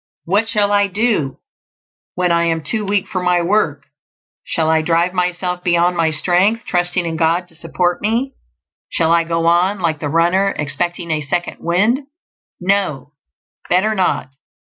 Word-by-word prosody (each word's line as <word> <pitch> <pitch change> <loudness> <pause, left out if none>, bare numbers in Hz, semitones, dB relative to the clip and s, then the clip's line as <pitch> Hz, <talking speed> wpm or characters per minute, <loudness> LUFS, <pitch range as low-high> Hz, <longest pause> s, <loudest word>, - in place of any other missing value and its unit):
What 205 +6 +1
shall 210 -3 +1
I 205 0 +3
do 200 - 0 0.8
when 180 -1 +1
I 170 0 +2
am 165 -1 -1
too 220 +4 -2
weak 200 -1 0
for 185 -3 -3
my 180 -1 +2
work? 170 -7 0 0.6
Shall 160 -1 -1
I 160 0 +3
drive 170 +3 +1
myself 180 0 -1
beyond 175 0 +2
my 165 -2 +2
strength, 180 +8 +1
trusting 175 0 0
in 165 -1 -3
God 170 +2 +1
to 165 - -16
support 175 +2 -1
me? 235 +6 -1 0.6
Shall 165 -1 +1
I 170 0 +4
go 165 0 -1
on, 180 +4 +2
like 160 -4 -1
the 145 - -3
runner, 175 +5 +2
expecting 170 +4 -3
a 155 -1 0
"second 175 +5 -3
wind"? 205 +9 +1 0.6
No; 180 -8 -1 0.6
better 190 +5 +2
not. 185 -9 0
175 Hz, 160 wpm, -18 LUFS, 165-195 Hz, 0.8 s, I